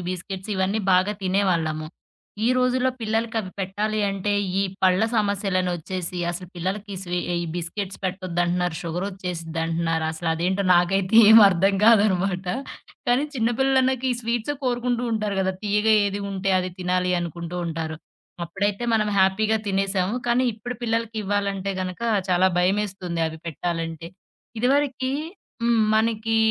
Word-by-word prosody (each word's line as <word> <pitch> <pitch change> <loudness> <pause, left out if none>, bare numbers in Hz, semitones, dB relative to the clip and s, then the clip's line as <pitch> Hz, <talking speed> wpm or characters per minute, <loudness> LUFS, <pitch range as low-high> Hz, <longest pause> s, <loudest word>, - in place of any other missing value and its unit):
Biscuits 190 +2 -6
ఇవన్నీ 190 +3 0
బాగా 185 +3 +3
తినేవాళ్ళము. 175 -5 0 0.6
ఈ - - +4
రోజుల్లో 255 0 +2
పిల్లలకవి 225 -2 -1
పెట్టాలి 210 +3 -2
అంటే 195 +1 -1 0.3
ఈ - - +2 0.2
పళ్ళ 185 0 +4
సమస్యలనోచ్చేసి 185 -3 -1
అసలు 180 +1 -6
పిల్లలకి 195 +3 -3
స్వీ 180 -1 -2
ఆహ్, 175 - 0
ఈ - - -5
బిస్కెట్స్ 185 +3 -4
పెట్టొద్దంటున్నారు. 180 -2 -1
షుగర్ 175 +3 -3
ఒచ్చేసిదింటున్నారు. 165 -3 -2
అసలు 165 +1 -4
అదేంటో 185 +4 0
నాకైతే 190 +4 +2
ఏం 225 - +10
అర్థం 195 +2 +2
కాదనమాట. 195 -4 +3 0.6
కానీ, 250 +4 +3
చిన్న 230 -2 +1
పిల్లలన్నాక 265 -1 +2
ఈ - - -1
స్వీట్స్ 235 +4 -1
కోరుకుంటూ 245 -1 0
ఉంటారు 215 -2 -1
గదా! 190 0 0
తీయగా 210 +2 +2
ఏది 200 +1 -3
ఉంటే 195 0 -1
అది 185 0 -2
తినాలి 180 0 0
అనుకుంటూ 170 +1 -5
ఉంటారు. 160 -1 -4 0.5
అప్పుడైతే 200 +6 -2
మనం 215 -1 +2
హ్యాపీగా 210 +4 +3
తినేసాము. 195 0 0
కానీ, 245 +2 +3
ఇప్పుడు 245 +3 -6
పిల్లలకివ్వాలంటే 205 -4 -1
గనుక 185 +4 -6 0.3
చాలా 180 +1 +4
భయమేస్తుంది 185 -2 0
అవి 160 0 -9
పెట్టాలంటే. 165 0 -4 0.5
ఇదివరకి 260 +1 +1 0.5
హ్మ్ 235 -1 +3
మనకి 225 0 +1
195 Hz, 130 wpm, -24 LUFS, 180-220 Hz, 0.6 s, ఏం